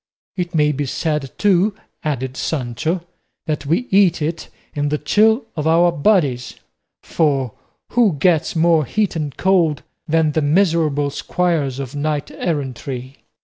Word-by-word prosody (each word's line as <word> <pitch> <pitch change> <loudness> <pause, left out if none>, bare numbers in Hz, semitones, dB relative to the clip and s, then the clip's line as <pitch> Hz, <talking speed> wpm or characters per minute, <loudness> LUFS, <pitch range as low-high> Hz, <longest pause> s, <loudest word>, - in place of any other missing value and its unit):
"It 175 -2 -3
may 150 -1 +3
be 145 0 -3
said, 150 -1 -2
too," 200 0 +3 0.3
added 130 -4 -2
Sancho, 155 +6 -2 0.4
"that 150 -3 -3
we 170 - +1
eat 190 -3 +4
it 160 +2 -3 0.2
in 145 -1 -1
the 150 - 0
chill 220 - +3
of 155 -1 -2
our 170 +2 +4
bodies; 145 - +1 0.5
for 135 -7 0 0.4
who 235 -6 +3
gets 160 +2 +1
more 165 -1 +4
heat 205 - -1
and 150 -4 -4
cold 175 -6 +2 0.2
than 160 0 +2
the 155 - 0
miserable 155 -3 +2
squires 160 -6 -1
of 135 0 -6
knight 145 0 -2
errantry? 135 -4 -4
155 Hz, 140 wpm, -19 LUFS, 145-175 Hz, 0.5 s, eat